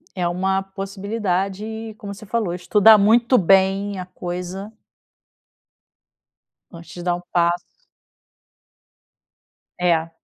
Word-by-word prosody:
É 180 -2 -1
uma 190 +2 0
possibilidade 200 +2 -4
como 200 -1 -7
você 205 +2 -12
falou 215 -4 -1
estudar 210 +4 +5
muito 235 +5 +4
bem 195 +2 +3
a 180 - -5
coisa 180 +2 -6 2.0
antes 170 -1 -12
de 175 - -7
dar 175 0 +1
um 175 - -7
passo. 175 0 +2 2.2
É. 165 -2 +1
195 Hz, 100 wpm, -21 LUFS, 180-205 Hz, 2.2 s, estudar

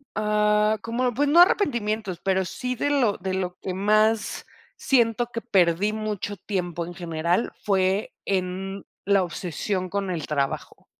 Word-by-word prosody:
ah, 210 0 +2
como 245 +2 -1
pues 285 +5 +1
no 330 +4 +5
arrepentimientos, 220 - +1
pero 190 0 +2
sí 250 +8 -4
de 285 - -1
lo 255 -8 +2
de 190 +1 -3
lo 180 -1 -3
que 185 - -3
más 215 +3 +1 0.3
siento 240 -3 +2
que 230 - -4
perdí 195 -2 +2
mucho 210 -2 -3
tiempo 175 -3 -3
en 175 - -8
general 170 +3 -1
fue, 195 +1 +1
en 190 +1 -2 0.2
la 200 -1 +4
obsesión 180 +2 -3
con 200 0 -2
el 170 -4 -3
trabajo. 140 -2 -3
200 Hz, 145 wpm, -25 LUFS, 185-220 Hz, 0.3 s, no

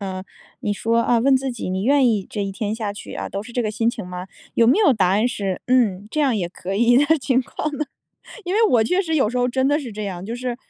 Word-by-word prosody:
呃， 190 -1 -5 0.4
你 205 - -1
说， 230 +3 +1
啊， 235 0 +2
问 265 +3 +4
自 265 0 -2
己： 235 - -5
“你 190 +1 -2
愿 275 +3 +4
意 210 -5 0
这 205 - -3
一 195 - -3
天 205 +2 -3
下 215 -3 -4
去， - - -9
啊， - - -5
都 200 +1 -4
是 240 - -12
这 245 0 0
个 215 - -1
心 225 +2 +1
情 220 -6 -7
吗？ 180 0 -7 0.3
“有 230 - +4
没 265 - +4
有 405 -9 +5
答 190 -6 +2
案 210 +6 +2
是 195 -5 -3
“嗯， 215 -6 +2
这 305 - -4
样 270 -5 +2
也 180 -5 -1
可 190 +1 -6
以 240 +3 +4
的。” 290 +4 +4
情 255 -1 +1
况 305 +5 -4
呢？ 305 - -1 0.6
因 365 +2 -2
为 445 0 +4
我 235 - +4
确 360 - +1
实 320 -3 -2
有 240 -7 +3
时 250 - -4
候 245 0 +2
真 260 +2 +1
的 295 +1 +2
是 250 -7 -7
这 210 0 -5
样， 185 -2 -5
就 230 +3 -5
是， 245 -1 -4
230 Hz, 305 characters per minute, -21 LUFS, 200-260 Hz, 0.6 s, 有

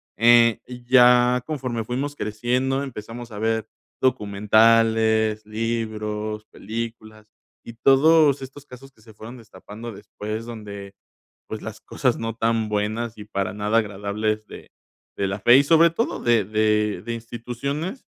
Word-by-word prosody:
eh, 115 0 +5
y 125 -1 -11
ya 125 0 +5
conforme 125 -7 -3
fuimos 135 +5 -4
creciendo, 125 +5 -1
empezamos 120 -2 -8
a 105 - -7
ver 110 0 -1 0.3
documentales, 110 0 +3
libros, 110 -1 -3
películas, 110 0 -8 0.4
y 115 - -9
todos 140 +4 +4
estos 135 +2 -10
casos 135 +1 -14
que 110 - -25
se 110 0 -16
fueron 110 +3 -10
destapando 110 +1 -10
después 105 +2 -7
donde, 100 -4 -9 0.5
pues, 110 - -7
las 110 0 -8
cosas 125 -3 -1
cosas - - -9
no 115 -1 -3
tan 115 -1 0
buenas 110 +2 -2
y 105 - -9
para 100 -2 -3
nada 105 +2 +1
agradables 105 +1 -2
de - - -12 0.5
de 100 - -1
la 95 +1 -4
fe, 120 +5 +7
y - - +5
sobre 165 +2 +5
todo 225 +8 -2
de 115 -3 +2
de 105 0 0
de 120 0 -3
instituciones, 125 - -5
115 Hz, 145 wpm, -23 LUFS, 105-125 Hz, 0.5 s, fe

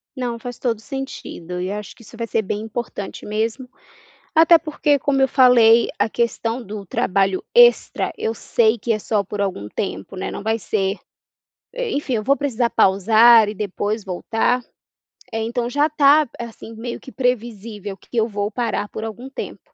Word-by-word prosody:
Não, 245 -3 -3
faz 245 0 -7
todo 235 -3 -1
o - - -16
sentido 220 - -6
e 185 +1 -3
acho 210 -1 -6
que - - -18
isso 230 +1 -14
vai 230 0 -3
ser 225 - 0
bem 205 0 -3
importante 220 -2 -6
mesmo. 225 +4 -2 0.7
Até 330 +1 +7
porque 300 -2 0
como 275 0 +1
eu 265 - +5
falei, 235 -3 +5
a - - +2
questão 235 +1 -1
do 205 -1 -7
trabalho 190 +1 0
extra, 485 0 +4
eu 225 - -1
sei 225 +1 +1
que 230 +1 -1
é 215 - -2
só 210 -1 0
por 200 +1 -5
algum 185 - -3
tempo, 195 - -5
né, 190 - -4
não - - -6
vai 220 +1 0
ser 195 -1 -1 0.8
eh, - - -3
enfim, 280 -3 -1
eu 215 - 0
vou 275 +4 +3
precisar 250 -5 0
pausar 220 +3 +5
e 210 - -4
depois 205 +1 -3
voltar. 225 +6 0 0.7
Eh, 225 0 -2
então 240 +1 -2
já 290 +4 +2
está 300 0 +4
assim 230 -1 -8
meio 235 +2 -6
que 265 - -12
previsível 225 -5 -3
que 240 - -10
eu 225 0 +3
vou 205 -1 -3
parar 225 -4 -2
por 220 - -6
algum 225 +4 -7
tempo. 270 - -7
225 Hz, 180 wpm, -21 LUFS, 210-250 Hz, 0.8 s, Até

